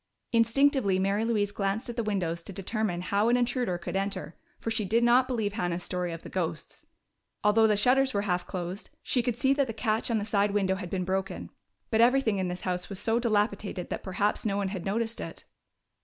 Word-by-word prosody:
Instinctively 230 -2 +3
Mary 195 +3 +1
Louise 210 -3 +1
glanced 200 +4 -1
at 240 - -5
the 235 - 0
windows 185 -6 -1
to 180 - -9
determine 195 -1 -2
how 200 +4 +1
an 245 - +4
intruder 245 -6 0
could 175 - -6
enter, 195 -4 -3 0.2
for 225 - -3
she 225 -1 0
did 225 +5 +2
not 245 +2 +5
believe 220 -5 -1
Hannah's 175 -5 -2
story 180 -1 -2
of 165 0 -7
the - - -8
ghosts. 170 -3 -4 0.6
Although 220 +2 +5
the 210 -1 +3
shutters 260 +5 +4
were 200 -4 0
half 180 -3 -1
closed, 180 +1 -5
she 250 - +1
could 235 -1 -2
see 265 +2 +3
that 280 -1 +1
the 225 - -4
catch 220 +1 -1
on 230 - +2
the 205 - -2
side 205 -1 +1
window 190 -2 +2
had 185 -2 -5
been 185 -1 -2
broken. 190 +1 -3 0.4
But 220 0 +4
everything 235 -4 +4
in 185 - 0
this 180 0 -4
house 180 -1 -2
was 195 -2 -5
so 225 +1 +1
dilapidated 205 -5 -1
that - - -3
perhaps 200 +2 -1
no 200 -2 0
one 200 -1 0
had 190 -3 -5
noticed 225 +3 -1
it. - - -8
205 Hz, 215 wpm, -28 LUFS, 190-230 Hz, 0.6 s, not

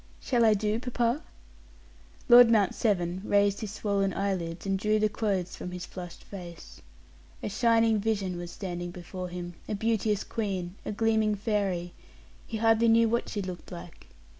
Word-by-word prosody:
"Shall 240 -3 +1
I 215 -1 +5
do, 210 +2 0
papa?" 245 +2 0 1.1
Lord 245 -1 +9
Mount 210 -5 +3
Severn 180 -4 0
raised 200 -1 +2
his 215 - -4
swollen 200 -3 0
eyelids 185 -4 -2
and 195 -1 0
drew 215 +2 +2
the 215 0 +3
clothes 200 -4 -1
from - - -6
his 180 0 -6
flushed 175 -2 -9
face. 175 -4 -10 0.6
A - - -2
shining 225 0 +3
vision 200 -4 -1
was 175 0 -6
standing 175 -2 -5
before 180 +1 -7
him, 175 0 -6 0.2
a 210 - -1
beauteous 215 -1 0
queen, 190 -5 -3
a - - -1
gleaming 220 0 +2
fairy; 195 -5 -1 0.5
he 225 - -4
hardly 225 +1 +4
knew 230 0 +5
what 235 +1 0
she 205 - -3
looked 180 -1 -7
like. 175 -1 -10
205 Hz, 165 wpm, -28 LUFS, 180-225 Hz, 1.1 s, Lord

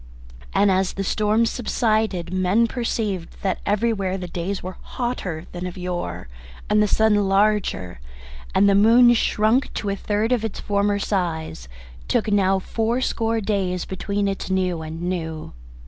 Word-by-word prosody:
And 200 -1 +3
as 190 0 +1
the 195 - -3
storms 215 +3 +1
subsided 215 -7 0
men 185 +5 +3
perceived 215 -7 -3
that 190 -2 0
everywhere 205 -3 0
the 180 -1 -6
days 180 +3 -4
were 185 +1 -6
hotter 190 -10 -4
than 180 +1 -5
of 180 - -8
yore, 180 - -4 0.4
and 210 0 +4
the 210 - +3
sun 220 +1 +3 0.2
larger, 195 - +1 0.6
and 200 - +5
the 200 - +5
moon, 230 +4 +6
shrunk 225 +3 +2
to 205 - -2
a - - -1
third 210 +3 -1
of 245 -3 +1
its 225 - -4
former 205 0 +1
size, 165 - -2 0.4
took 215 - 0
now 195 -1 +3
fourscore 225 +2 -1
days 195 -3 -1
between 200 +1 -2
its 195 -1 -3
new 185 -3 0
and 160 +2 -6
new. 160 - -4
200 Hz, 150 wpm, -22 LUFS, 180-220 Hz, 0.6 s, moon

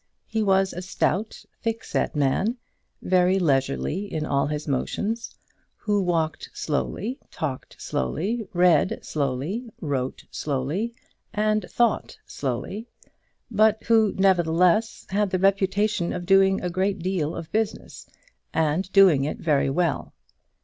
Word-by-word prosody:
He 220 0 -2
was 195 -2 +2
a 180 - -5
stout, 190 +3 -1 0.2
thickset 225 -7 -1
man, 150 - +1 0.5
very 185 +1 +3
leisurely 150 +4 0
in 155 -1 -2
all 140 -2 +1
his 150 +1 -4
motions, 210 - -2 0.4
who 205 -1 0
walked 165 -3 -1
slowly, 210 - -2
talked 140 -5 -5
slowly, 195 - -2
read 175 -3 +3
slowly, 150 - -2
wrote 135 -4 -3
slowly, 155 - -2 0.4
and 215 0 +1
thought 235 -2 +1
slowly; 145 - -4 0.6
but 215 0 +3
who, 220 -3 +4
nevertheless, 180 +2 +3
had 205 +1 +1
the 185 - 0
reputation 195 0 +1
of 180 -1 -4
doing 195 +1 +4
a 180 - -2
great 190 +3 0
deal 175 -4 -1
of 160 - -7
business, 220 0 -3 0.5
and 160 +4 +1
doing 185 -9 +6
it 150 - -2
very 145 -4 +1
well. 165 +3 -1
185 Hz, 120 wpm, -25 LUFS, 155-210 Hz, 0.6 s, doing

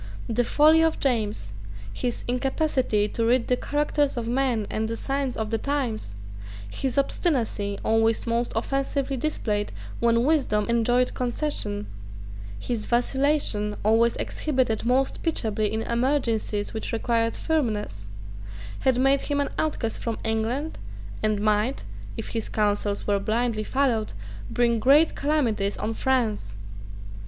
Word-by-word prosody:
The 235 +2 +1
folly 310 +6 +5
of 325 -1 +2
James, 210 - -1 0.4
his 245 - -3
incapacity 250 -4 +1
to 230 - -2
read 235 +1 +3
the 250 - +4
characters 290 0 0
of 230 -1 -2
men 245 -3 +1
and 220 0 -2
the 230 - -3
signs 270 -1 -2
of 220 0 -3
the 225 - 0
times, 245 - -2 0.5
his 260 - -3
obstinacy, 235 - 0
always 225 0 +2
most 235 +1 0
offensively 275 +3 -1
displayed 220 -7 -1 0.3
when 235 0 +3
wisdom 260 -8 +2
enjoined 240 +2 +2
concession, 240 - -1 0.7
his 225 - -3
vacillation, 245 -4 +1
always 230 +2 +4
exhibited 255 -7 -1
most 265 +2 +1
pitiably 220 -10 0
in 220 +1 -1
emergencies 235 -4 0
which 220 - -4
required 230 0 0
firmness, 215 - -1 0.7
had 260 -2 +2
made 270 +2 +3
him 285 -1 -1
an 285 - 0
outcast 255 -8 -1
from 230 -2 -3
England, 225 +8 -1 0.4
and 215 -1 +1
might, 215 +4 +1 0.3
if - - -5
his 225 -2 -2
counsels 205 -1 0
were 200 -1 +2
blindly 220 +1 0
followed, 240 -3 0 0.4
bring 235 -1 +2
great 285 +7 +5
calamities 245 -9 0
on 220 +2 -2
France. 220 - 0
235 Hz, 130 wpm, -25 LUFS, 215-270 Hz, 0.7 s, folly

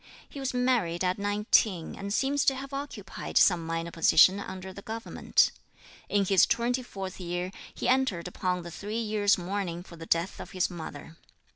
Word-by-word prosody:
He 285 - -9
was 270 -1 -1
married 245 -9 +1
at 185 +1 0
nineteen, 205 -3 +2
and 200 0 -6
seems 275 +5 +1
to 270 - +4
have 275 +1 -7
occupied 275 -8 -5
some 175 -4 +5
minor 165 +1 -3
position 175 +4 +5
under 190 -1 -7
the 200 - -9
government. 225 +2 +1 0.6
In 200 -1 +2
his 190 -1 +5
twenty 245 +2 +1
fourth 195 -6 -7
year 175 +1 -3 0.2
he - - -4
entered 250 -10 +1
upon 180 0 -2
the 170 - -8
three 210 +6 -5
years' 215 -2 +2
mourning 180 -1 -3
for 170 -2 -13
the 165 0 -9
death 170 +3 0
of - - -9
his 185 0 0
mother. 160 -2 -8
195 Hz, 175 wpm, -28 LUFS, 175-225 Hz, 0.6 s, some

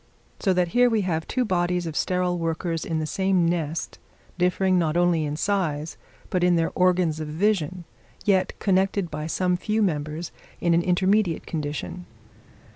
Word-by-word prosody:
So 195 - +1
that 180 -1 +1
here 245 +7 +4
we 225 -2 +1
have 165 -4 -2
two 255 -1 0
bodies 180 -3 0
of 160 -2 -5
sterile 180 -1 0
workers 165 0 -2
in 165 - -2
the 155 - -1
same 190 +2 +1
nest, 165 -2 -2 0.4
differing 180 +1 +2
not 160 -1 0
only 175 -3 +2
in 145 0 -3
size, 160 -5 -1 0.4
but 180 -1 +1
in 180 -1 +4
their 165 -1 +1
organs 180 -4 +2
of 155 - -4
vision, 180 +1 0 0.4
yet 190 -3 +2
connected 190 -2 +1
by 150 +1 -4
some 180 +2 +1
few 215 +4 0
members 155 -1 -2 0.3
in 170 -1 +2
an 170 - +4
intermediate 185 0 +1
condition. 160 +3 -5
175 Hz, 165 wpm, -25 LUFS, 160-185 Hz, 0.4 s, here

